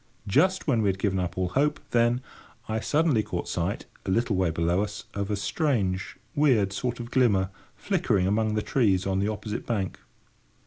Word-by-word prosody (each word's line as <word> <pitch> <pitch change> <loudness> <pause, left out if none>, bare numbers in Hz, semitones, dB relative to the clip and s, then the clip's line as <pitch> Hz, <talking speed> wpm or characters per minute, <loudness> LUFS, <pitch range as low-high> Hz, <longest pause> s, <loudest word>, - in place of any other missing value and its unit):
Just 185 - +2
when 120 -7 +2
we 105 - +2
had 95 - -1
given 95 -1 0
up 90 0 -3
all 90 -1 0
hope, 150 +8 +1
then, 120 +1 +3 0.5
I 110 0 -1
suddenly 150 -1 +2
caught - - -4
sight, - - -2 0.2
a - - -5
little 115 +2 +1
way 95 -2 +2
below 85 +3 +1
us, 105 -1 -4
of 100 0 -3
a 105 - +1
strange, 100 - -1 0.2
weird 120 -10 +3
sort 120 +4 -2
of 120 0 -7
glimmer 100 -7 +3 0.2
flickering 95 -3 +1
among 105 +2 +1
the 105 - 0
trees 100 -8 +2
on 95 0 0
the 100 - +1
opposite 105 0 -4
bank. 100 -6 -2
105 Hz, 185 wpm, -27 LUFS, 95-120 Hz, 0.5 s, then